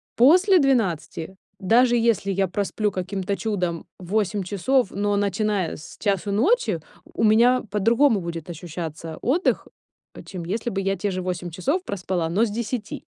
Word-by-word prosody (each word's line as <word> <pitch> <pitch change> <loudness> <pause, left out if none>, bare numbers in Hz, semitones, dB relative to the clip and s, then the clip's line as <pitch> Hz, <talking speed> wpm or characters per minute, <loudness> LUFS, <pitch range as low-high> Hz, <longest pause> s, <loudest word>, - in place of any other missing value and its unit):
после 360 - +6
12, 190 - 0 0.2
даже 240 +5 +4
если 225 -4 +1
я 195 0 +1
просплю 205 +2 -1
каким-то 190 +1 -3
чудом 180 -4 -2
8 195 +1 -1
часов, 205 +6 +1
но 205 +1 0
начиная 200 -1 0
с 155 - -11
1:00 200 -1 -1
ночи, 220 - +2 0.2
у - - -4
меня 235 +4 +5
по-другому 230 +3 +3
будет 170 0 -6
ощущаться 165 -1 -6
отдых, 325 +10 +1 0.5
э, - - -10
чем 180 -3 -7
если 220 +6 -2
бы 195 -3 -2
я 195 0 -1
те 200 +2 -2
же 185 0 -3
8 180 -1 -3
часов 275 - -1
проспала, 185 -3 -2
но 200 +7 +2
с - - -4
10. 225 +1 -4
200 Hz, 155 wpm, -23 LUFS, 180-230 Hz, 0.5 s, после